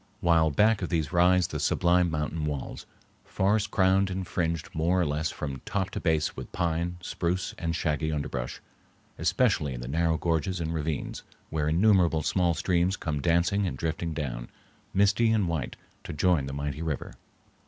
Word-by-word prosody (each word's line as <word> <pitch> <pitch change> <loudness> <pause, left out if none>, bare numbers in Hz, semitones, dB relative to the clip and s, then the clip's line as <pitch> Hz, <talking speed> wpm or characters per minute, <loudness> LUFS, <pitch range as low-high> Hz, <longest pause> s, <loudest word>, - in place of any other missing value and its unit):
while 80 -2 +4
back 105 +8 +3
of 90 - -2
these 80 -4 -1
rise 90 +1 +4
the 75 - -4
sublime 90 +3 +3
mountain 75 0 -2
walls, 70 -3 -5 0.4
forest 105 +2 +1
crowned 95 -1 +3
and 95 0 -3
fringed 85 -2 -2
more 85 +4 +1
or 90 - +2
less 75 +1 -1
from 70 -3 -5
top 95 -1 -2
to - - -3
base 80 -3 0
with 65 - -8
pine, 85 +1 -1
spruce, 90 +1 -2
and 85 0 -1
shaggy 80 -1 -1
underbrush, 65 -5 -3 0.6
especially 85 - +1
in - - -6
the - - -6
narrow 80 +3 +1
gorges 85 +3 -1
and 80 0 -2
ravines, 75 -3 -3 0.3
where 75 -1 0
innumerable 85 -3 +3
small 85 +2 +1
streams 90 +2 +1
come 75 -3 -3
dancing 85 +5 +2
and - - -4
drifting 80 +1 -2
down, 65 -6 -4 0.4
misty 100 +3 +3
and 105 -5 +2
white, 80 -7 -3 0.3
to - - -6
join 75 -3 +2
the - - -5
mighty 70 +1 -3
river. 80 -4 -3
85 Hz, 170 wpm, -28 LUFS, 75-90 Hz, 0.6 s, while